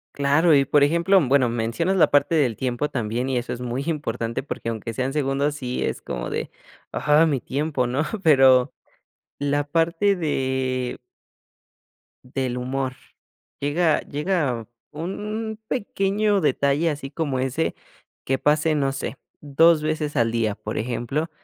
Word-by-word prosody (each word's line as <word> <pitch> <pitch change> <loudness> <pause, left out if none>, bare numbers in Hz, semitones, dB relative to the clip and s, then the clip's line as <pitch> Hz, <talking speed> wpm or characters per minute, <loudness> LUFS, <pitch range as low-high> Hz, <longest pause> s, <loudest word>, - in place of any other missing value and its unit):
Claro, 145 +3 +4
y 135 -1 +4
por 145 +1 +4
ejemplo, 170 +6 +4
bueno, 135 -1 +4
mencionas 120 +11 -1
la 175 - +5
parte 145 +3 +3
del 130 -8 +2
tiempo 130 +2 -1
también 120 +1 -2
y 130 - 0
eso 120 - -3
es 125 - -7
muy 125 +2 -3
importante 140 -7 -2
porque 130 -4 -5
aunque 115 0 -4
sean 130 +4 -2
segundos, 145 0 0
sí 125 -3 -3
es - - -3
como 60 0 -5
de, - - -3 0.4
ah, 150 +3 +3
mi 140 -4 0
tiempo, 140 -1 -1
¿no?, 125 +4 -1 0.2
pero 135 -4 +5 0.7
la 145 0 0
parte 170 +6 +2
de 130 -5 -1 1.3
del 130 -2 -1
humor, 130 +1 -2 0.7
llega 155 +3 +2
llega 145 - -2 0.2
un 210 +7 -5
pequeño 205 -3 0
detalle 145 +2 +2
así 140 -2 -4
como 145 -6 -2
ese 135 +5 -1 0.5
que 135 0 +1
pase, 155 +1 +2
no 135 -2 +1
sé, 135 0 -5 0.2
2 155 +2 +4
veces 155 -1 -2
al 115 -1 +2
día, 110 -3 0
por 105 - -6
ejemplo, 125 +7 -2
140 Hz, 145 wpm, -23 LUFS, 125-160 Hz, 1.3 s, la